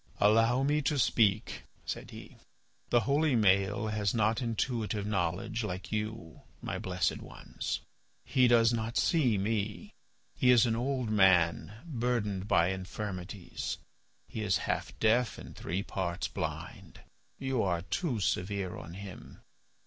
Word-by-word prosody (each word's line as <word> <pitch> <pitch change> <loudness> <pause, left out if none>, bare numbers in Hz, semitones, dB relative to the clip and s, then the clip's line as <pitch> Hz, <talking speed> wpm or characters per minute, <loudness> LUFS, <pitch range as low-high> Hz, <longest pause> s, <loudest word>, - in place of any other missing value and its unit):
"Allow 115 +5 +4
me 150 +2 +2
to 150 +1 0
speak," 110 -4 +2 0.2
said - - -5
he; - - -11 0.5
"the 120 - +4
holy 145 +1 +2
Maël 100 0 +3
has 105 -1 0
not 110 +1 +2
intuitive 115 -3 -1
knowledge 95 +3 -1
like 90 -3 -5
you, 105 -6 -4 0.2
my - - -4
blessed 90 -2 -1
ones. - - -5 0.4
He 125 0 +4
does 115 -1 +5
not 115 0 -2
see 130 - +3
me. 110 - -2 0.4
He 125 - +3
is 125 -2 +7
an 115 -1 +1
old 125 -1 -1
man 95 -1 +3
burdened 115 - -1
by 85 -4 +4
infirmities; 95 -1 -5 0.5
he 110 - -5
is 95 -4 +2
half - - -2
deaf 115 +2 +2
and - - -10
three 90 +5 -3
parts 85 -4 -2
blind. - - -6 0.4
You 135 -3 -1
are 85 -3 0
too 115 - -1
severe 95 -1 -1
on 85 - -9
him. 100 -1 -10
105 Hz, 135 wpm, -31 LUFS, 95-120 Hz, 0.5 s, is